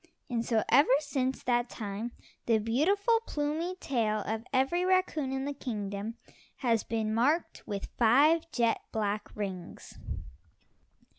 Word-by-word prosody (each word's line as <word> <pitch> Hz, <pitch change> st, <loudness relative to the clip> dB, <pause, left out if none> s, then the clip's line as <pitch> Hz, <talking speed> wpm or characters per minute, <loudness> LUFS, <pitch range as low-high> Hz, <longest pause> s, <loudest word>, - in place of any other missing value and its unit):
And 230 Hz, -1 st, 0 dB
so 225 Hz, -3 st, +1 dB
ever 280 Hz, +2 st, +6 dB
since 270 Hz, -3 st, -2 dB
that 240 Hz, 0 st, +1 dB
time 215 Hz, +1 st, -5 dB, 0.3 s
the 230 Hz, -2 st, +5 dB
beautiful, 380 Hz, -, +2 dB
plumy 310 Hz, +5 st, -1 dB
tail 225 Hz, -, 0 dB
of 220 Hz, +2 st, -3 dB
every 270 Hz, +8 st, +2 dB
raccoon 365 Hz, -7 st, +1 dB
in 265 Hz, 0 st, -2 dB
the 285 Hz, -, -2 dB
kingdom 210 Hz, -4 st, -4 dB, 0.5 s
has 230 Hz, -2 st, +3 dB
been 220 Hz, -1 st, -1 dB
marked 285 Hz, +9 st, +1 dB
with 200 Hz, -1 st, -3 dB
five 295 Hz, +8 st, +5 dB
jet 235 Hz, -2 st, +1 dB
black 210 Hz, -1 st, -1 dB
rings. 190 Hz, -4 st, -6 dB
240 Hz, 130 wpm, -30 LUFS, 220-290 Hz, 0.5 s, ever